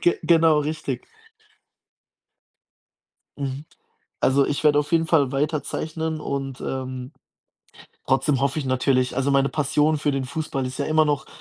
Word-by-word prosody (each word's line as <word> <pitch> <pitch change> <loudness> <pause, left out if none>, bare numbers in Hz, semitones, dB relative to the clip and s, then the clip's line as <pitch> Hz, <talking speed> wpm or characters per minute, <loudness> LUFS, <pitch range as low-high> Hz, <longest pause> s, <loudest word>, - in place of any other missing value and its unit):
Ge 175 - +2
genau, 165 -2 +4
richtig. 150 -4 -3 2.4
Mhm. 140 +1 -4 0.6
Also, 135 +1 +3
ich 145 +1 -2
werde 145 -1 +5
auf 145 - -1
jeden 165 -1 +3
Fall 145 -5 +2
weiter 150 +2 0
zeichnen 160 0 -4
und, 135 -3 -4
ähm, 130 0 -5 0.9
trotzdem 135 +1 +2
hoffe 140 +2 0
ich 150 - -3
natürlich 130 0 +1
also, 135 +1 +1
meine 135 0 +3
Passion 150 +1 +1
für 145 - 0
den 135 -1 -1
Fußball 140 -1 -3
ist 130 +2 -7
ja 140 - 0
immer 155 +1 +3
noch 145 -2 -1
140 Hz, 145 wpm, -23 LUFS, 135-155 Hz, 2.4 s, werde